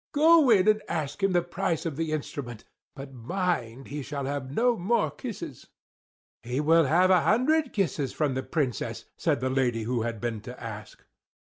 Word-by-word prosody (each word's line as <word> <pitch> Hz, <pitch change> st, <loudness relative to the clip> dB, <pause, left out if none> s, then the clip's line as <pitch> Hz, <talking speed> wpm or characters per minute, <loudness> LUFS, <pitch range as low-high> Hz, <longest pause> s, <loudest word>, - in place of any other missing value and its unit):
Go 315 Hz, -1 st, +6 dB
in 210 Hz, -3 st, +5 dB
and 215 Hz, 0 st, +4 dB
ask 150 Hz, +4 st, -3 dB
him 195 Hz, 0 st, +2 dB
the 175 Hz, -1 st, +2 dB
price 175 Hz, -1 st, -2 dB
of 160 Hz, -4 st, -2 dB
the 160 Hz, +1 st, -2 dB
instrument; 135 Hz, -6 st, -5 dB, 0.3 s
but 135 Hz, -1 st, -9 dB
mind, 130 Hz, -2 st, -3 dB
he 145 Hz, +2 st, -4 dB
shall 140 Hz, 0 st, -4 dB
have 140 Hz, -1 st, -3 dB
no 235 Hz, -, +2 dB
more 215 Hz, +3 st, +1 dB
kisses!" 210 Hz, -, -8 dB, 0.7 s
"He 125 Hz, +4 st, -3 dB
will 160 Hz, +2 st, +4 dB
have 180 Hz, +6 st, +4 dB
a 180 Hz, -2 st, +5 dB
hundred 280 Hz, +6 st, +2 dB
kisses 150 Hz, -, -1 dB
from 150 Hz, -4 st, 0 dB
the 130 Hz, -, -2 dB
Princess!" 130 Hz, -, -2 dB
said -, -, 0 dB
the 130 Hz, 0 st, 0 dB
lady 125 Hz, -4 st, +1 dB
who 120 Hz, +1 st, -1 dB
had 115 Hz, -1 st, -3 dB
been 115 Hz, -2 st, -3 dB
to 125 Hz, +3 st, -9 dB
ask. 110 Hz, -2 st, -9 dB
150 Hz, 180 wpm, -27 LUFS, 125-190 Hz, 0.7 s, Go